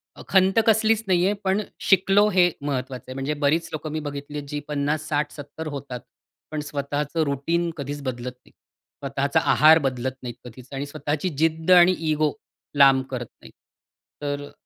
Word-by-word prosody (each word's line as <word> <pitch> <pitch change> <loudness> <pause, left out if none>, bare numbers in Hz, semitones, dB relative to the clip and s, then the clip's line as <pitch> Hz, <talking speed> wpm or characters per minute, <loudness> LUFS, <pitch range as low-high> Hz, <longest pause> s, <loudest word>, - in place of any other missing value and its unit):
अ, - - -11
खंत 190 +1 +3
कसलीच 220 0 +3
नाहीये. 185 +1 +3
पण 195 +2 +1 0.3
शिकलो 195 +2 +5
हे 180 -3 +4
महत्वाचं 130 -3 -3
आहे. 130 - -6
म्हणजे 135 +3 -2
बरीच 165 +3 +2
लोक 155 0 -4
मी 155 +1 -3
बघितली 145 +1 -6
आहेत 145 -1 -6
जी 150 -1 -3
50, 150 +1 -1
60, 150 0 0
70 155 +2 -8
होतात, 130 -3 -6 0.5
पण 155 - -3
स्वतःचं 145 +2 -2
रुटीन 165 +5 -1
कधीच 145 0 -5
बदलत 125 -1 -4
नाही. - - -21
स्वतःचा 140 0 -3
आहार 155 +3 +7
बदलत 130 0 -1
नाहीत 120 -1 -6
कधीच 125 +1 -12
आणि 135 +1 -3
स्वतःची 150 +3 -3
जिद्द 160 +2 +1
आणि 180 0 +8 0.2
इगो 155 -1 +2 0.5
लांब 135 -1 +6
करत 120 -1 -3 0.2
नाहीत. - - -14 0.7
तर 145 0 -3
अ, - - -15
145 Hz, 170 wpm, -24 LUFS, 140-165 Hz, 0.7 s, आणि